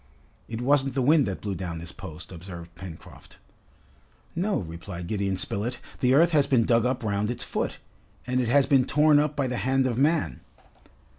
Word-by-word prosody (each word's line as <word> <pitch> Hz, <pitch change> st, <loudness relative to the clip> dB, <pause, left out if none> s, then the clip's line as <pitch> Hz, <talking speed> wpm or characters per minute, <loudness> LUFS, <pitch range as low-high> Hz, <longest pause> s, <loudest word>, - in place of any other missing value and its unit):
"It 115 Hz, 0 st, -5 dB
wasn't 135 Hz, 0 st, +2 dB
the 135 Hz, -, +1 dB
wind 150 Hz, -1 st, +4 dB
that 95 Hz, -, -4 dB
blew 100 Hz, -2 st, -3 dB
down 90 Hz, -2 st, -5 dB
this 85 Hz, +1 st, -7 dB
post," 85 Hz, -3 st, -10 dB
observed 85 Hz, -1 st, -9 dB
Pencroft. 85 Hz, -1 st, -12 dB, 1.0 s
"No," 195 Hz, +4 st, 0 dB
replied 85 Hz, +1 st, -6 dB
Gideon 100 Hz, 0 st, -1 dB
Spilett. 105 Hz, +6 st, -2 dB, 0.2 s
"The 130 Hz, +1 st, +3 dB
earth 165 Hz, +4 st, +5 dB
has 145 Hz, -4 st, +3 dB
been 125 Hz, -5 st, +3 dB
dug 115 Hz, 0 st, +3 dB
up 125 Hz, -1 st, -2 dB
round 105 Hz, 0 st, 0 dB
its 120 Hz, -, -3 dB
foot, -, -, -3 dB, 0.5 s
and 125 Hz, 0 st, 0 dB
it 120 Hz, -, -1 dB
has 135 Hz, +3 st, +4 dB
been 135 Hz, -3 st, +4 dB
torn 150 Hz, +1 st, +4 dB
up 150 Hz, 0 st, 0 dB
by 140 Hz, -2 st, 0 dB
the 125 Hz, -1 st, -2 dB
hand 135 Hz, +1 st, +1 dB
of 125 Hz, -1 st, -1 dB
man." 155 Hz, +3 st, +1 dB
120 Hz, 190 wpm, -26 LUFS, 95-140 Hz, 1.0 s, earth